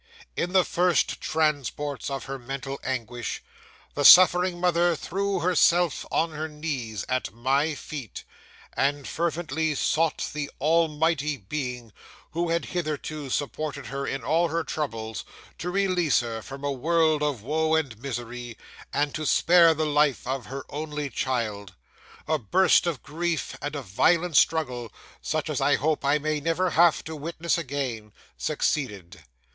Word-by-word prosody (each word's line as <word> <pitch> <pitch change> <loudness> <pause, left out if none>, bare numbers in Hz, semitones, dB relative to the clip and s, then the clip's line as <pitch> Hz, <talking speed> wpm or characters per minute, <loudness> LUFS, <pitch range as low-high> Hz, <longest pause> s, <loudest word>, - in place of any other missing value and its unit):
'In 175 - -1
the 185 -2 +5
first 180 -2 +1
transports 145 -3 -1
of 135 -1 -4
her 135 0 -5
mental 135 +2 -5
anguish, 120 -2 -4 0.5
the 145 - -1
suffering 180 +2 +8
mother 175 -1 +3
threw 195 +5 -2
herself 175 -2 +3
on 165 0 +1
her 155 +1 -4
knees 140 - -4
at 130 0 -1
my 135 +7 0
feet, 135 - -7 0.5
and 140 0 0
fervently 160 -2 -1
sought 160 +2 0
the 150 -1 -3
Almighty 155 -1 +1
Being 125 0 -5 0.4
who 170 +1 -1
had 170 0 0
hitherto 155 -4 -4
supported 145 +1 -3
her 140 0 -4
in 135 -3 -3
all 165 +7 +2
her 165 +1 -1
troubles 115 -10 -4 0.4
to 175 - -3
release 180 -6 +2
her 115 -2 -5
from 135 +4 -9
a 145 - 0
world 155 +3 +2
of 145 -8 -1
woe 160 +4 +1
and 145 -8 -1
misery, 120 -2 -6 0.3
and 145 -1 0
to 155 - -3
spare 170 0 +5
the 155 +1 0
life 150 -2 +2
of 130 -1 -3
her 135 +1 -6
only 150 -1 -4
child. 105 -7 -2 0.5
A 155 0 +1
burst 180 - +3
of 165 -6 -3
grief, 165 0 -2
and 145 +1 -4
a 140 - -4
violent 165 - +2
struggle, 125 -9 +2 0.3
such - - -2
as - - -2
I - - +4
hope 155 0 0
I 140 +2 +3
may 155 0 -1
never 165 +4 0
have 170 0 +4
to 160 - -6
witness 165 +3 -2
again, 130 -8 -4 0.2
succeeded. 95 - -2
150 Hz, 150 wpm, -26 LUFS, 130-165 Hz, 0.5 s, suffering